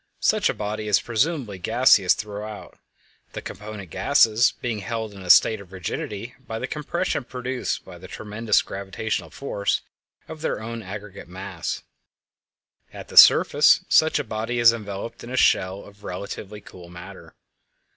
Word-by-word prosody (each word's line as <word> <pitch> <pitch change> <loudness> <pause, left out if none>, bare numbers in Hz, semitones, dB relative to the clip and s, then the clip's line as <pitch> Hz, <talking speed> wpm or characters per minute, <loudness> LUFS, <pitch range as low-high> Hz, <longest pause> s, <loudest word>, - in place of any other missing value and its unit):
Such - - +3
a - - -1
body 105 +1 -4
is 105 - +4
presumably 120 - -1
gaseous 100 -2 +4
throughout, 105 0 -8 0.5
the - - -5
component 105 -3 -8
gases 115 -4 +4
being 120 -4 -3
held 110 +1 -4
in 100 - -11
a 90 - -9
state 110 +3 +6
of 95 -2 -15
rigidity 100 +5 -5
by 115 -3 -7
the - - -3
compression 150 +1 -2
produced 125 +1 -4
by 90 -2 -12
the 95 - -11
tremendous 105 +2 0
gravitational 100 +3 -4
force 100 -7 -2 0.5
of 160 -1 -9
their - - -2
own 115 +1 -6
aggregate 100 -1 -9
mass. 95 -1 -6 1.1
At - - -10
the - - -11
surface - - +7
such 160 0 +4
a 145 - -1
body 115 +1 -3
is 120 -1 +6
enveloped 105 +1 -7
in 120 - -9
a 130 - -4
shell 95 -4 +2
of 100 0 -17
relatively 100 +3 -7
cool 90 -3 -13
matter. 90 +3 -12
105 Hz, 155 wpm, -24 LUFS, 100-115 Hz, 1.1 s, surface